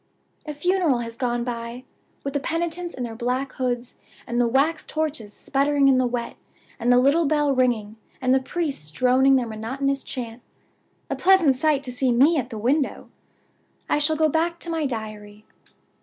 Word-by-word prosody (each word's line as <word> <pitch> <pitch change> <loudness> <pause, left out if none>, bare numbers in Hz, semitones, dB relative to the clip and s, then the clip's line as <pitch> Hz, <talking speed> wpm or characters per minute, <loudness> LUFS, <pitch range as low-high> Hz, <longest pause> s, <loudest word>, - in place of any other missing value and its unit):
"A 300 - -3
funeral 355 -3 +2
has 230 -1 -6
gone 240 -1 -1
by, 235 0 -5 0.4
with 275 - -4
the 285 - 0
penitents 340 +3 -3
in 255 - -4
their 235 -2 -5
black 250 +3 -2
hoods, 245 -1 -3 0.3
and 240 0 0
the 240 - +3
wax 285 +6 +1
torches 300 -9 -3
sputtering 280 +4 +1
in 265 -1 +5
the 255 - +2
wet, 240 -1 -4 0.4
and 240 +1 +2
the 245 - +6
little 280 +5 +4
bell 295 -1 +2
ringing, 230 -4 0 0.2
and 255 0 +2
the 265 - +3
priests 280 - -3
droning 255 - +4
their 255 -2 +2
monotonous 260 +5 -2
chant. 240 -2 -6 0.7
A - - 0
pleasant 360 -7 +4
sight 285 +1 +1
to 255 - -3
meet 250 -2 +4
me 305 +6 +5
at 255 -3 -2
the 225 - -6
window! 265 +6 -1 0.8
I - - +1
shall 305 +2 +1
go 315 0 +3
back 330 +3 0
to 340 - -2
my 320 -3 0
Diary. 215 -3 -7
265 Hz, 180 wpm, -24 LUFS, 240-300 Hz, 0.8 s, the